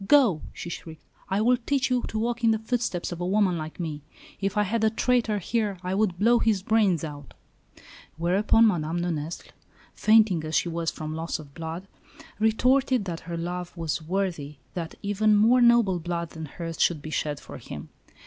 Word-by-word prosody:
"Go!" 245 - +5
she 175 - -7
shrieked. 160 -2 -9 0.3
"I 195 +2 +1
will 245 +3 +4
teach 260 +2 0
you 250 -1 +2
to 220 - -4
walk 235 +2 -1
in 230 - +5
the 220 - +3
footsteps 220 -6 -2
of 175 0 -5
a - - -1
woman 195 -2 +2
like 155 +1 -6
me! 155 -4 -4 0.4
If 195 +1 -2
I 210 - +4
had 220 +3 -1
the 220 - +4
traitor 230 -1 +1
here, 205 0 -1
I 180 +1 -2
would 195 -3 +1
blow 235 +5 +4
his 215 -5 +1
brains 205 -7 +2
out!" 145 -3 -8 0.8
Whereupon, 195 +7 +3
Madame 170 -4 0
de 175 - 0
Nesle, 155 +1 -5 0.4
fainting 215 -6 +4
as 155 0 -3
she 175 - +2
was 165 -1 -1
from 155 0 -5
loss 165 +1 -3
of 145 -3 -12
blood, 165 +4 -6 0.5
retorted 250 +2 +3
that 170 -3 -4
her 170 - -3
lover 175 +1 -4
was 165 -1 -2
worthy 165 -4 -2 0.2
that 170 -3 -5
even 210 +1 +3
more 230 +4 +5
noble 235 -6 +5
blood 170 0 -3
than 160 -1 -7
hers 165 +2 -6
should 155 -4 +2
be 155 - -6
shed 150 -2 -2
for - - -10
him. - - -8
185 Hz, 195 wpm, -26 LUFS, 165-220 Hz, 0.8 s, Go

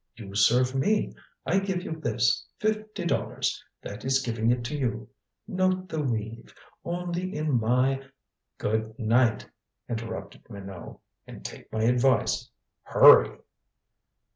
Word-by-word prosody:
You 100 -4 -10
serve 125 +5 +4
me. 205 +11 +1 0.3
I 190 +4 +3
give 190 -2 -2
you - - -6
this. 120 -3 +1
Fifty 215 -3 -2
dollars. - - -1 0.2
That 100 - -7
is 135 0 +2
giving 115 -2 0
it 120 0 +1
to 135 +6 -4
you. 130 -5 -2 0.4
Note 185 0 0
the 160 -3 -2
weave. 115 -3 -4 0.3
Only 180 +1 -3
in 150 -5 +1
my 130 +4 +1 0.2
" - - -58
"Good 110 +1 -2
night," 115 0 +2 0.4
interrupted 115 -4 -6
Minot. 95 -4 -9 0.3
"And - - -11
take - - -9
my 110 0 -1
advice. 125 +3 +2 0.3
Hurry!" - - +6
125 Hz, 130 wpm, -27 LUFS, 110-170 Hz, 0.4 s, Hurry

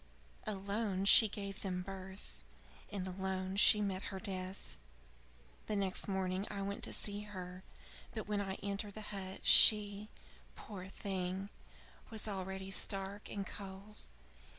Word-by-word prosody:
Alone 200 -1 -1
she 220 +2 +9
gave 200 -1 -6
them 180 -2 -2
birth, 190 0 -9 0.5
and 195 -3 -3
alone 190 0 -2
she 210 +1 +7
met 195 -2 -2
her 190 - -4
death." 190 -2 -5 0.9
"The 210 - 0
next 195 -2 +2
morning 190 0 -1
I 200 -1 -3
went 200 +1 -4
to - - -6
see 205 -1 0
her, 185 -2 -7 0.5
but 220 -3 -4
when 210 -1 0
I 195 -1 -3
entered 200 0 -3
the 215 - -6
hut, 190 -1 -6
she, 210 -1 +7 0.5
poor 190 -4 -8
thing, 190 0 -3 0.6
was 220 -1 -3
already 190 -1 -4
stark 195 +1 0
and 200 -1 -3
cold. 200 +2 -8
195 Hz, 135 wpm, -36 LUFS, 190-205 Hz, 0.9 s, she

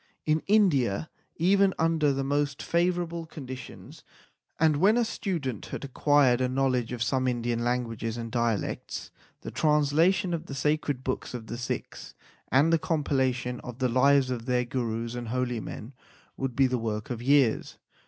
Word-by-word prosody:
In 155 0 +2
India, 155 - +2 0.2
even 195 +3 +3
under 160 -3 +2
the 135 0 -1
most 140 0 -1
favourable 170 -1 0
con 150 -4 -9
ditions, 130 0 -9 0.6
and 155 -2 +4
when 200 +8 +4
a 240 - +3
student 155 - -3
had - - -6
acquired 135 -2 +3
a 130 - +1
knowledge 130 -2 0
of 120 -1 -2
some 130 0 0
Indian 120 -1 -1
languages 115 -2 -2
and 115 -1 -5
dialects, 115 -4 -2 0.3
the - - -7
translation 160 +5 +2
of 170 +1 -4
the 135 - -6
sacred 145 -1 0
books 130 -1 -3
of 115 -2 -6
the 115 - -6
Sikhs, 120 - -5 0.4
and 145 +6 +4
the 165 - +4
compilation 130 -5 0
of 125 -2 -8
the 130 -1 +1
lives 130 +1 +4
of 120 -1 -4
their 125 -1 +1
Gurus 115 -2 -3
and 120 -1 -5
holy 125 0 -1
men, 110 +3 -8 0.4
would 135 -2 -3
be 135 - +4
the 125 -1 0
work 110 0 -3
of 120 -1 -4
years. 135 -3 +2
130 Hz, 165 wpm, -27 LUFS, 120-155 Hz, 0.6 s, and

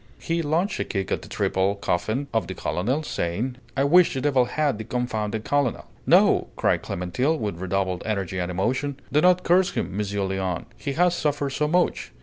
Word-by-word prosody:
He 170 0 -1
launched 165 +6 0
a - - +1
kick 95 -2 -3
at - - 0
the - - -12
triple 95 +2 0
coffin 110 +7 -1
of 115 - 0
the 95 - -5
colonel, 100 - -1
saying, 120 - -2 0.2
"I 135 - +3
wish 170 +2 +5
the 130 - -1
devil 135 -3 +3
had 145 -3 0
the - - -4
confounded 110 -3 -2
colonel!" 145 -5 0 0.2
"No!" - - +5
cried - - +1
Clémentine, 110 - -1
with 105 - -3
redoubled 95 -1 -1
energy 95 -3 -2
and 90 0 -2
emotion. 130 +10 -1
"Do 150 - +3
not 180 +1 +4
curse 185 +2 +3
him, 95 - -3
Monsieur 100 -1 -2
Léon! 95 -2 -2
He 140 - -4
has 175 +3 +3
suffered 145 -4 -1
so 150 +2 0
much! 175 +3 +1
125 Hz, 190 wpm, -24 LUFS, 95-150 Hz, 0.2 s, wish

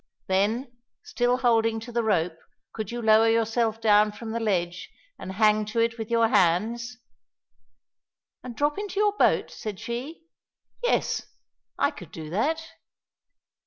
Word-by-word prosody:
"Then, 215 +7 0 0.3
still 245 0 0
holding 225 -3 +2
to 240 +2 -9
the 235 0 0
rope, 175 -6 0 0.3
could 220 -3 -5
you 240 0 -5
lower 220 +1 +5
yourself 225 0 +1
down 210 -1 +4
from 220 +2 -8
the 230 - -2
ledge 180 -5 -1 0.3
and 190 - -6
hang 215 +1 +3
to 215 +2 -3
it 230 0 +1
with 220 0 -5
your 230 -1 +3
hands?" 220 +6 +1 1.5
"And 250 -2 -8
drop 295 - 0
into 410 -1 -4
your 415 -1 +3
boat?" - - +2
said 210 -3 -6
she. 245 +9 -6 0.6
"Yes, - - 0 0.5
I - - +2
could - - -12
do 160 -5 -8
that." 315 - 0
225 Hz, 145 wpm, -26 LUFS, 210-240 Hz, 1.5 s, lower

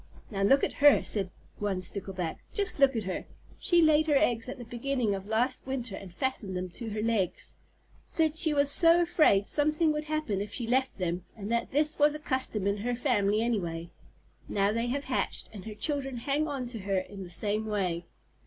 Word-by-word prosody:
"Now 195 -2 -3
look 270 +8 +4
at - - 0
her," 290 -1 +7
said 195 -4 -2 0.3
one 200 -3 -1
Stickleback. 185 -4 -3 0.2
"Just 400 -7 0
look 275 -2 +5
at 225 - -1
her. 185 -1 -4 0.3
She 345 -1 +4
laid 310 0 +4
her 295 -2 +4
eggs 245 -5 +1
at 260 - -6
the 245 - -8
beginning 240 -1 -1
of 195 0 -5
last 245 +5 0
winter 250 -6 -3
and 195 -2 -9
fastened 200 -2 -1
them 180 0 -4
to 225 +6 -7
her 215 0 -3
legs. 220 -5 -1 0.5
Said 320 -2 +1
she 320 -1 +4
was 285 -1 +3
so 335 +3 +7
afraid 305 - +3
something 305 +4 +2
would 300 0 -3
happen 305 -11 -1
if 205 0 -5
she 235 - -3
left 260 +3 0
them, 180 -1 -2
and 205 +1 -6
that 235 0 0
this 300 +3 0
was 295 +1 +4
a - - -5
custom 260 -8 -2
in 200 +1 +1
her 240 +4 -2
family 210 -3 +1
anyway. 170 -8 -2 0.6
Now 200 0 +2
they 230 +2 -1
have 280 +3 -2
hatched, 260 -2 -2
and 200 -2 -9
her 215 -1 -7
children 270 +1 -1
hang 285 +6 0
on 275 -4 -3
to 235 -2 -4
her 195 0 -1
in 195 +1 -5
the 180 - -10
same 210 +4 -1
way." 180 -5 -1
235 Hz, 210 wpm, -29 LUFS, 200-285 Hz, 0.6 s, her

